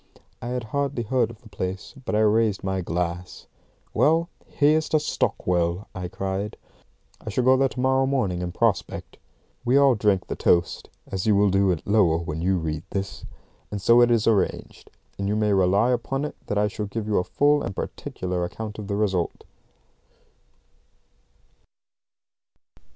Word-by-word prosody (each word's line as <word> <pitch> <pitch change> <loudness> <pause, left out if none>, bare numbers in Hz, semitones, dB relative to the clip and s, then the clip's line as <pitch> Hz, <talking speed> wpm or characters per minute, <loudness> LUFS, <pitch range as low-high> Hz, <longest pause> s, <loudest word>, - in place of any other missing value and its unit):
I 120 - -5
had 125 0 -2
hardly 135 +1 -2
heard 120 0 +1
of 115 -1 -13
the 110 - -14
place, 95 -1 -5
but - - -1
I 110 - +3
raised 110 -1 +2
my 95 0 -1
glass. 90 +1 -4 0.5
"Well, 165 +3 +3 0.2
here's 155 +2 +2
to 155 - +3
Stockwell!" 90 - -1
I 90 -2 -4
cried; 95 +3 -4 0.7
"I - - -5
shall 125 - 0
go 130 +1 +6
there 135 0 +2
to 130 - -8
morrow 130 +1 +2
morning 105 -11 0
and 90 0 -3
prospect." 105 -1 -1 0.5
We 125 +3 +3
all 140 -2 +6
drank 105 -4 +1
the - - -4
toast 85 -1 +1 0.2
(as 95 +2 -4
you 105 - +5
will 100 0 +4
do 95 0 +3
at 85 - -3
Lowell 90 -6 +3
when 80 0 -4
you 95 +2 +2
read 80 -2 -3
this); 95 0 -4 0.4
and 105 - -4
so 115 +5 +5
it 120 - +5
is 115 -2 +2
arranged, 105 -5 0 0.3
and 100 - -1
you 105 - 0
may 105 -1 +2
rely 100 +5 +3
upon 135 +3 -1
it - - -6
that 105 - -1
I 105 0 +3
shall 105 0 -4
give 105 +2 -4
you 105 -1 +1
a - - 0
full 145 +7 +2
and 100 - -4
particular 90 -1 -4
account 110 +4 -6
of 105 - -6
the 100 - -2
result. 95 -5 -1
105 Hz, 175 wpm, -24 LUFS, 95-120 Hz, 0.7 s, go